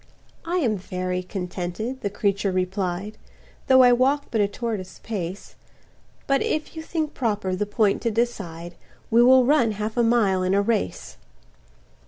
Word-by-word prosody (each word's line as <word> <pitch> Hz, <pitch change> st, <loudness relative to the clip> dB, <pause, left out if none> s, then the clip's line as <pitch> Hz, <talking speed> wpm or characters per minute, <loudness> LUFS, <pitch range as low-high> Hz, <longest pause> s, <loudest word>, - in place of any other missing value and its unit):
"I 345 Hz, +2 st, -1 dB
am 235 Hz, -, +1 dB
very 185 Hz, 0 st, -3 dB
contented," 185 Hz, +6 st, -5 dB
the 200 Hz, -, -1 dB
creature 200 Hz, -1 st, 0 dB
replied, 185 Hz, +2 st, -2 dB, 0.5 s
"Though 260 Hz, -1 st, +7 dB
I 245 Hz, -1 st, +6 dB
walk 275 Hz, +4 st, +1 dB
but 220 Hz, -, +1 dB
a 200 Hz, -, +3 dB
tortoise's 205 Hz, -3 st, -5 dB
pace, 195 Hz, -3 st, -5 dB, 0.7 s
But 275 Hz, 0 st, +2 dB
if 310 Hz, +1 st, -2 dB
you 320 Hz, -, -5 dB
think 315 Hz, -2 st, -3 dB
proper 205 Hz, -6 st, -1 dB
the 205 Hz, +2 st, -2 dB
point 205 Hz, -1 st, +1 dB
to 235 Hz, -, 0 dB
decide, 190 Hz, -7 st, -3 dB, 0.4 s
We 230 Hz, +1 st, +6 dB
will 255 Hz, +1 st, +6 dB
run 245 Hz, -5 st, +3 dB
half 215 Hz, +3 st, -4 dB
a 240 Hz, -, +4 dB
mile 220 Hz, -5 st, +2 dB
in 185 Hz, +1 st, +1 dB
a 200 Hz, -, +4 dB
race." 220 Hz, 0 st, -2 dB
210 Hz, 160 wpm, -24 LUFS, 185-245 Hz, 0.7 s, Though